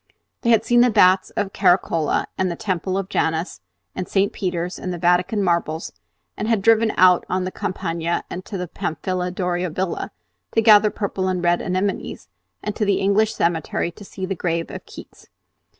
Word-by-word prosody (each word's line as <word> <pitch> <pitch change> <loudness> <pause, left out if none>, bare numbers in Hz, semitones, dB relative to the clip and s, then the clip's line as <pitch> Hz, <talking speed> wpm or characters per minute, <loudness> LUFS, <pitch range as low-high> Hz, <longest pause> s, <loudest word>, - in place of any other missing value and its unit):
They 235 - 0
had 225 -1 +4
seen 240 +1 +4
the 245 - +5
Baths 185 -3 +4
of 200 -2 -1
Caracalla 175 -4 +2
and 190 -1 0
the 170 - -3
Temple 185 0 -2
of 195 -1 -2
Janus 160 -1 -1 0.3
and 185 - -4
St. 200 0 +1
Peter's 180 -1 -3
and 185 - -4
the 175 - -4
Vatican 180 +4 +2
marbles, 170 -2 -1 0.4
and 215 - -3
had 225 -4 +1
driven 225 0 +4
out 180 -1 +6
on 185 0 0
the 185 - -3
Campagna 170 -3 -2
and 185 - -6
to 200 - -5
the 180 -1 -4
Pamphili 180 +3 -3
Doria 180 -1 -2
Villa 185 +3 -3 0.4
to 225 - +3
gather 210 -1 +7
purple 195 -3 -3
and 180 -1 -1
red 175 0 +2
anemones, 190 +2 -3 0.3
and 210 0 -3
to - - -1
the 200 -1 +2
English 210 +3 +2
cemetery 170 0 -1
to 205 - -13
see 190 -1 -6
the 195 - -2
grave 170 -2 -2
of - - -7
Keats. - - -13
185 Hz, 185 wpm, -22 LUFS, 175-200 Hz, 0.4 s, gather